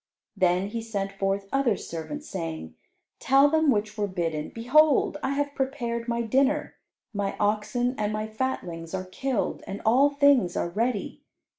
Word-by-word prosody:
Then 185 0 +2
he 230 +2 -4
sent 200 -3 -3
forth 195 0 -2
other 275 -6 +2
servants, 290 - -6
saying, 165 - -5 0.5
"Tell 275 +2 +5
them 315 -1 +3
which 215 -3 0
were 205 - +1
bidden, 165 -5 -2
'Behold, 290 +5 +3
I 270 0 -1
have 285 0 -1
prepared 245 -4 -2
my 235 0 0
dinner; 275 +6 +1 0.4
my 200 -1 -2
oxen 215 +4 0
and 210 0 0
my 215 0 -2
fatlings 190 -8 -4
are 185 0 -4
killed, 250 +5 -2
and 195 +1 -5
all 260 +6 +5
things 280 -10 +3
are - - -1
ready. 220 +3 -2
220 Hz, 155 wpm, -26 LUFS, 195-270 Hz, 0.5 s, Tell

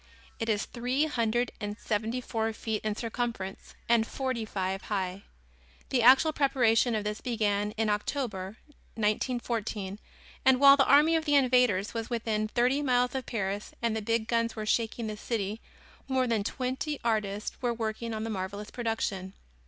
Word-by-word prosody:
It 225 - -2
is 210 -1 +1
three 250 +5 0
hundred 240 -4 0
and 205 0 -4
seventy 225 +3 -2
four 225 -2 -1
feet 220 -1 -3
in 215 -1 -1
circumference 230 -4 -4
and 230 -1 +3
forty 260 -4 -2
five 190 -2 -2
high. 190 -1 -3 0.6
The 255 -3 +2
actual 265 +6 +6
preparation 245 -5 +3
of 215 - -1
this 210 +1 -3
began 210 -4 0
in 225 0 0
October, 210 -2 -2 0.4
1914, 215 -2 -1 0.4
and 260 -1 +5
while 275 0 +9
the 275 -1 +3
army 300 +4 +6
of 320 -1 0
the 290 -2 +3
invaders 250 -7 +3
was 225 -1 -4
within 220 -3 -1
thirty 250 +5 +2
miles 250 -3 +2
of 265 -2 -4
Paris 205 -2 -3
and 230 -2 0
the 220 - -2
big 225 +1 0
guns 230 0 0
were 215 -1 -4
shaking 230 +1 0
the 215 -1 -4
city, 215 -1 -3 0.5
more 260 -1 +1
than 225 -4 0
twenty 260 +6 -3
artists 210 -3 -1
were 245 -2 +1
working 230 0 -3
on 215 - -3
the 225 - -3
marvelous 200 +1 -5
production. 220 -5 -2
225 Hz, 165 wpm, -29 LUFS, 210-250 Hz, 0.6 s, while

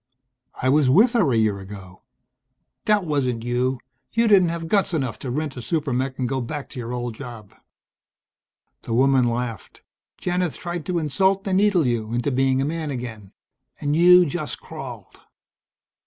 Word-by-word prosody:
"I 130 - -1
was 140 0 +4
with 215 - +5
her 195 - +3
a 115 - +2
year 105 -3 +1
ago." 95 -2 -11 0.8
"That 210 -3 +3
wasn't 130 -7 -1
you. 125 +2 0 0.3
You 230 0 +2
didn't 190 -5 +5
have 165 0 -4
guts 195 -1 +1
enough 130 -6 -2
to 130 - -5
rent 145 +2 -3
a 125 - -6
super 150 0 -1
mech 130 +1 -2
and 125 - -1
go 135 +1 -2
back 145 +4 -5
to 135 - -8
your 120 0 -5
old 120 -1 -3
job." 115 -4 -10 1.3
The 115 - -3
woman 130 0 +4
laughed. 115 -3 -5 0.4
"Janith 180 -2 -1
tried 175 -3 -5
to 180 - 0
insult 190 +6 +1
and 190 -1 +2
needle 200 -5 +3
you 115 -2 -1
into 120 +4 0
being 135 +1 +2
a - - -1
man 160 0 -3
again. 115 -7 -6 0.5
And 145 +1 0
you 180 +2 +7
just 145 - -3
crawled." - - -9
135 Hz, 170 wpm, -23 LUFS, 120-170 Hz, 1.3 s, you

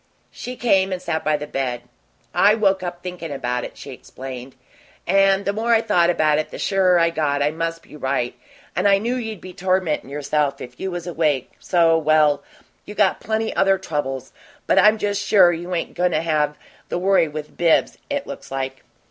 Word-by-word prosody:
She 250 - -7
came 195 -6 +2
and 185 - -2
sat 160 -3 -3
by 155 -1 +2
the 150 - -6
bed. 130 -4 -3 0.5
"I 205 +2 +5
woke 195 -3 +2
up 175 -1 -6
thinkin' 180 -3 -6
about 125 -3 -2
it," - - -8
she - - -9
explained. 130 0 -9 0.5
"And 195 +1 +3
the 200 - 0
more 230 +2 +2
I 225 - +3
thought 175 -6 +3
about 155 -3 +2
it 155 - -3
the - - -8
surer 185 -2 +3
I 170 0 +3
got 145 -3 0
I 145 - +1
must 165 +1 -4
be - - -14
right, 130 -4 -1 0.4
and 185 +3 +2
I 200 -1 +5
knew 230 +5 -1
you'd 225 -5 -4
be 185 0 -10
tormentin' 185 -7 0
yourself 145 0 -1
if 125 0 -10
you 190 - -3
was 175 -2 -5
awake, 155 -6 0
so 165 -2 +3
well, 155 -2 +3 0.4
you 210 - -10
got 200 -2 +2
plenty 220 +1 -2
other 195 0 +3
troubles, 135 -7 -4 0.3
but - - +4
I'm 215 +1 +6
just 205 -1 -1
sure 185 -4 +5
you 175 +2 -4
ain't 165 - -3
goin' 180 0 +1
to 155 - +1
have 150 -2 0 0.3
the - - -1
worry 190 -2 +3
with 150 0 -7
Bibbs 170 -2 +2
it 285 -1 -2
looks - - -9
like." 135 0 -4
170 Hz, 200 wpm, -21 LUFS, 150-195 Hz, 0.5 s, I'm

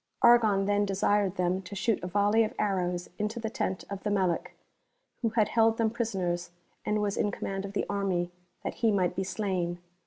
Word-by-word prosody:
Argon 220 -5 +6
then 205 0 +2
desired 200 0 +1
them 180 +1 0
to 190 +2 -9
shoot 210 +2 0
a 180 - -4
volley 205 +4 +3
of 215 - -3
arrows 180 -3 0
into 210 +2 -2
the 220 -1 -3
tent 185 -4 -2
of 200 -1 -6
the 210 - -2
Melic 190 -4 0 0.7
who 230 - +2
had 215 -1 +2
held 225 -1 +3
them 225 -1 +2
prisoners 185 -7 -2 0.3
and 210 - 0
who 210 - +1
was 200 -1 -1
in - - +2
command 195 -1 -4
of 200 - -7
the - - 0
army, 190 -3 -1 0.3
that - - -3
he 225 -2 +4
might 185 -3 +1
be 190 - -1
slain. 185 -3 -2
200 Hz, 205 wpm, -29 LUFS, 185-215 Hz, 0.7 s, Argon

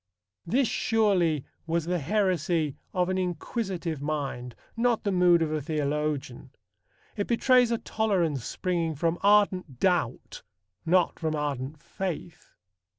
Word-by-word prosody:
This 255 +8 +2
surely 190 - +1 0.2
was 165 -1 0
the 175 +1 0
heresy 170 -4 0 0.2
of 180 -1 +1
an 185 0 0
inquisitive 180 - -3
mind, 140 -5 -3 0.2
not 235 0 +1
the 200 - 0
mood 175 -2 +4
of 155 - -2
a 155 -1 -1
theologian. 150 -3 -2 0.7
It 205 - -2
betrays 250 0 +4
a 235 - +1
tolerance 180 - 0
springing 170 +2 -2
from 165 +3 0
ardent 195 -9 +3
doubt, 175 -10 0 0.5
not 180 +1 +3
from 160 -2 -1
ardent 145 0 -3
faith. 175 -3 -6
170 Hz, 125 wpm, -27 LUFS, 150-195 Hz, 0.7 s, mood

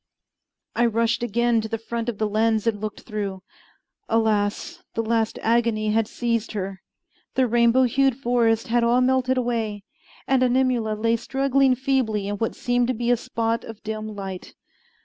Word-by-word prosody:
I 240 0 +3
rushed 230 +1 +1
again 235 0 +1
to 220 - -5
the 225 0 -3
front 230 +1 -4
of 225 - -4
the 215 - 0
lens 220 +1 +1
and 215 -3 0
looked 215 -1 -5
through. 200 -4 -5 0.7
Alas! 220 +9 0
the 225 - 0
last 225 0 0
agony 225 -2 +1
had 220 0 +1
seized 230 -2 -2
her. 195 -2 -4 0.5
The 260 - +3
rainbow 240 +2 +4
hued 265 +1 +2
forests 235 -3 +1
had 240 0 +2
all 240 +2 +3
melted 260 0 +2
away, 225 -4 -2 0.4
and 265 -1 +3
Animula 250 -3 +2
lay 230 +2 +1
struggling 270 +2 +2
feebly 250 -6 0
in 205 0 -3
what 225 +2 -2
seemed 245 0 +1
to 255 - 0
be 240 +1 0
a - - +5
spot 230 -1 -2
of 225 -1 -10
dim 215 0 -5
light. 195 -2 -7
230 Hz, 170 wpm, -24 LUFS, 215-245 Hz, 0.7 s, a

